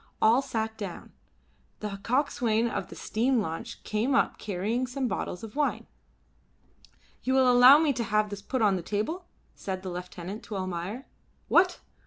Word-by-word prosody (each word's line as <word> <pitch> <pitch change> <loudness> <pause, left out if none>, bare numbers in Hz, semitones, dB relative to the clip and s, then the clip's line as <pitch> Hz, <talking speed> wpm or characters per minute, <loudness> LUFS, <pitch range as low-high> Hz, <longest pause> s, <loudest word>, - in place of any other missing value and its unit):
All 230 +4 +5
sat 225 -4 -3
down. 195 -5 -7 0.7
The 205 -2 -5
coxswain 235 -2 +1
of - - -3
the - - -11
steam 245 +3 +1
launch 200 +4 -5
came 230 +5 0
up 275 - +1
carrying 215 +6 -2
some 260 +1 -2
bottles 180 -4 -4
of 220 -2 -8
wine. 295 -1 0 1.4
"You 260 +1 0
will 260 -1 +5
allow 250 +3 +9
me 305 -2 +2
to 235 - -2
have 210 0 +1
this 205 -1 -6
put 250 +3 -1
upon 200 -3 +4
the - - -4
table?" 215 - -3 0.3
said 190 -1 -5
the 185 - -4
lieutenant 180 +3 -6
to 210 - -6
Almayer. 185 +6 -4 0.4
"What! 360 0 +4
220 Hz, 165 wpm, -28 LUFS, 200-260 Hz, 1.4 s, allow